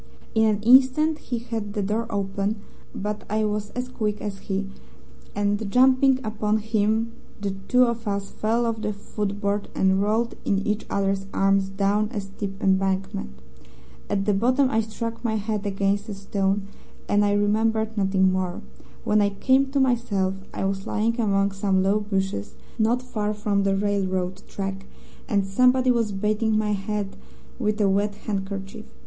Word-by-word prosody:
In 220 0 +4
an 210 -1 +1
instant 265 +6 +5
he 245 - -4
had 225 -3 -4
the 205 - -1
door 215 +4 -1
open, 200 0 -1 0.4
but 210 +1 -3
I 215 +1 +1
was 210 0 -2
as 250 0 -2
quick 215 -4 -2
as 200 -2 -5
he, 195 0 -3 0.7
and 205 +1 0
jumping 260 +1 +5
upon 215 -1 0
him 220 +1 0 0.3
the 200 -1 -2 0.2
two 250 0 +5
of 235 -2 -1
us 200 -1 -2
fell 230 +2 0
off 225 -1 -2
the 210 - -1
footboard 205 0 -3
and 190 0 +3
rolled 220 +3 +1
in 195 0 0
each 210 0 -1
other's 195 -1 0
arms 195 0 +3
down 200 +2 +1
a - - 0
steep 195 0 -6
embankment. 190 - +1 0.8
At 195 -1 0
the 205 - +3
bottom 255 +6 +3
I 225 - +3
struck 230 +2 -5
my 225 -2 0
head 210 -1 -2
against 200 +1 0
a 205 - -4
stone, 195 0 -1 0.4
and 205 0 +3
I 205 0 +2
remembered 220 +2 +1
nothing 190 -2 +3
more. 185 -1 -2 0.4
When 210 0 +3
I 200 - +3
came 260 +7 +2
to 275 +1 0
myself 230 -7 +1 0.2
I - - -3
was 195 0 -2
lying 230 +3 0
among 200 -2 +2
some 195 -1 +1
low 200 +2 +3
bushes, 195 - -2 0.2
not 235 +3 +2
far 215 -4 -2
from 205 -1 0
the 195 0 +2
railroad 190 -2 -1
track, 195 0 -5 0.4
and 200 -2 +2
somebody 250 +5 +4
was 230 -3 +1
bathing 215 +2 +1
my 215 -1 +1
head 205 0 -3 0.4
with 215 -2 0
a 205 - +4
wet 200 +1 +1
handkerchief. 195 0 -4
205 Hz, 165 wpm, -24 LUFS, 195-220 Hz, 0.8 s, instant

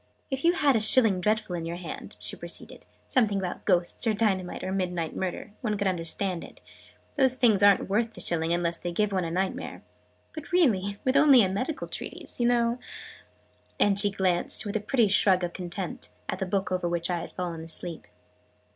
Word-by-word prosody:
"If 270 0 -3
you 340 +1 +4
had - - -5
had 280 -3 +4
a 220 - +2
'Shilling 215 -4 +5
Dreadful' 215 -2 -1
in 170 - -4
your 170 +1 -5
hand," 180 - -8
she - - -3
proceeded, - - -6 0.2
"something 215 -6 +1
about 185 -2 -5
Ghosts 180 +4 +3
or 220 - +2
Dynamite 190 -5 -1
or 185 - -3
Midnight 180 -4 -3
Murder 190 +3 -4
one 215 -3 -2
could 200 - -2
understand 180 0 -1
it: - - -13 0.6
those 260 -2 +9
things 220 -6 +3
aren't 200 -1 +4
worth 225 +4 -1
the - - -10
shilling, 165 -1 0
unless 170 -1 -1
they 175 - -4
give 210 +4 0
one 185 -3 -1
a - - -3
Nightmare. 185 +3 -4 0.5
But 310 -2 -9
really 205 - +1
with 260 +1 +1
only 280 -4 +6
a 190 - 0
medical 255 +11 -3
treatise, - - -7
you 240 - +2
know 240 0 +1 0.5
" - - -28
and 200 -1 +4
she 205 0 +5
glanced, 190 -1 +1
with 205 - -5
a - - +1
pretty 225 +2 +1
shrug 190 -2 +3
of 175 -1 -3
contempt, 180 0 -4 0.2
at - - -4
the 190 - -3
book 195 0 -2
over 180 -1 -1
which 170 +1 -1
I 175 - -1
had - - -9
fallen 170 -3 -5
asleep. 165 0 -8
195 Hz, 205 wpm, -26 LUFS, 175-225 Hz, 0.6 s, those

